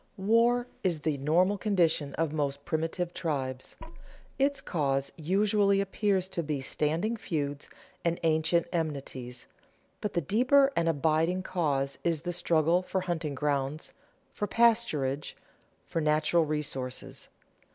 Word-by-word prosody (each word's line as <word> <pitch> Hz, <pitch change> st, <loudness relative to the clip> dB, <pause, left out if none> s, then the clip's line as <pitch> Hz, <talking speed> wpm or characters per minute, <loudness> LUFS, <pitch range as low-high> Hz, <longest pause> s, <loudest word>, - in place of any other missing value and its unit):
_ -, -, -36 dB
War 230 Hz, +5 st, +3 dB, 0.2 s
is 170 Hz, -5 st, 0 dB
the 150 Hz, -2 st, -1 dB
normal 180 Hz, +8 st, +2 dB
condition 165 Hz, -8 st, +1 dB
of 160 Hz, -1 st, -1 dB
most 140 Hz, -2 st, -2 dB
primitive 165 Hz, +2 st, -2 dB
tribes. 130 Hz, -5 st, -3 dB, 0.6 s
Its 280 Hz, +1 st, +2 dB
cause 140 Hz, -4 st, -1 dB
usually 200 Hz, +4 st, +2 dB
appears 195 Hz, -1 st, 0 dB
to 175 Hz, -, -2 dB
be 150 Hz, -3 st, -2 dB
standing 160 Hz, -, -1 dB
feuds 145 Hz, -9 st, -3 dB, 0.3 s
and 170 Hz, 0 st, 0 dB
ancient 160 Hz, +1 st, +2 dB
enmities, 135 Hz, -6 st, -4 dB, 0.6 s
but 210 Hz, -, -3 dB
the 175 Hz, -, +1 dB
deeper 255 Hz, -, +4 dB
and 165 Hz, 0 st, +2 dB
abiding 160 Hz, +4 st, +1 dB
cause 140 Hz, -7 st, -1 dB
is 165 Hz, -2 st, 0 dB
the 175 Hz, 0 st, -2 dB
struggle 170 Hz, 0 st, +2 dB
for 185 Hz, +1 st, -2 dB
hunting 165 Hz, -5 st, -3 dB
grounds, 140 Hz, +1 st, -2 dB, 0.4 s
for 205 Hz, -, -2 dB
pasturage, 210 Hz, -, +2 dB, 0.5 s
for 165 Hz, -, -2 dB
natural 155 Hz, +2 st, +2 dB
resources. 135 Hz, -4 st, -3 dB
165 Hz, 130 wpm, -29 LUFS, 145-190 Hz, 0.6 s, deeper